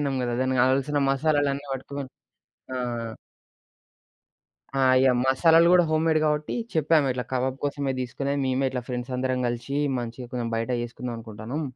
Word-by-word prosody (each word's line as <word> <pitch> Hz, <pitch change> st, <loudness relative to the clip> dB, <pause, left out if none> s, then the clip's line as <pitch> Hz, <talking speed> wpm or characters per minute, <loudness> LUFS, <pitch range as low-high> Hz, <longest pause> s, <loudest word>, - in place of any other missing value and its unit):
పట్టుకుపోయినం 140 Hz, -2 st, -1 dB
గదా! 120 Hz, -1 st, -1 dB
దానికి 130 Hz, -1 st, +1 dB
కావాల్సిన 135 Hz, +3 st, +2 dB
మసాలాలన్నీ 140 Hz, 0 st, +1 dB
పటకపోయినం. 135 Hz, +1 st, -6 dB, 0.6 s
ఆ! -, -, -2 dB, 2.0 s
ఆ! -, -, +3 dB, 0.2 s
ఇగ 130 Hz, 0 st, +5 dB
మసాలాలు 165 Hz, +5 st, +5 dB
గూడా 180 Hz, -1 st, +6 dB
హోమ్మేడ్ 155 Hz, 0 st, +2 dB
కాబట్టి 150 Hz, 0 st, 0 dB, 0.2 s
చెప్పాం, 155 Hz, -1 st, +3 dB
ఇట్లా 125 Hz, 0 st, -4 dB
కబాబ్ 130 Hz, 0 st, 0 dB
కోసమే 140 Hz, -1 st, -1 dB
తీసుకొని, 140 Hz, +3 st, -2 dB
మేమే 130 Hz, +1 st, +1 dB
ఇట్లా 125 Hz, -1 st, -3 dB
ఫ్రెండ్స్ 125 Hz, 0 st, -4 dB
అందరం 130 Hz, 0 st, -1 dB
కలిసి 120 Hz, +3 st, -3 dB, 0.2 s
మంచిగా 120 Hz, +1 st, -7 dB
కొంచెం 120 Hz, -2 st, -2 dB
బయట 115 Hz, +2 st, -2 dB
చేసుకుందాం 120 Hz, 0 st, -5 dB
అనుకుంటాన్నాం. 115 Hz, +6 st, -6 dB
130 Hz, 145 wpm, -25 LUFS, 125-145 Hz, 2.0 s, గూడా